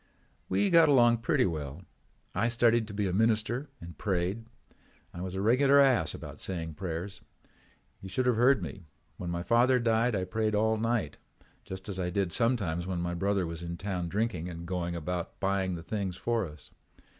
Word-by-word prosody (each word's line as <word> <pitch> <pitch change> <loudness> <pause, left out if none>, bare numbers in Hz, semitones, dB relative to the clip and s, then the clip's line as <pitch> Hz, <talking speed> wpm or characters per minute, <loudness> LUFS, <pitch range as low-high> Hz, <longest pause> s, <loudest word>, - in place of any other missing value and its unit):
"We 200 -2 +2
got 165 -2 +7
along 120 -4 +5
pretty 125 +3 +2
well. 75 -1 -4 0.5
I 115 - +1
studied 120 -1 +3
to 105 - -7
be 105 0 0
a 90 - -2
minister 115 +6 +1
and 85 0 -11
prayed. 95 +3 -1 0.7
I 85 - -7
was 95 0 -5
a 95 - -2
regular 135 +5 +5
ass 135 -4 +3
about - - -9
saying 80 -4 -4
prayers. 95 +4 -5 0.8
You 95 - -9
should 125 +7 -1
have 125 -2 +3
heard 125 -2 +4
me. 85 +2 -8 0.3
When 90 - -5
my 85 0 -2
father 120 +5 +4
died 115 0 +2
I 95 - 0
prayed 110 +3 -1
all 110 +1 +2
night, 110 -9 -1 0.5
just 95 0 -7
as 95 -2 -4
I 90 -1 -1
did 95 -1 -1
sometimes 100 -8 0
when 95 -2 -2
my 85 0 -2
brother 95 +1 0
was 85 0 -5
in 85 0 -5
town 90 -2 -3
drinking 100 -4 -1
and 85 -1 -7
going 85 -1 -2
about 85 +1 -4
buying 95 -2 0
the 85 - -7
things 95 -3 -3
for 115 -5 0
us. 75 -1 -13
100 Hz, 190 wpm, -29 LUFS, 85-115 Hz, 0.8 s, got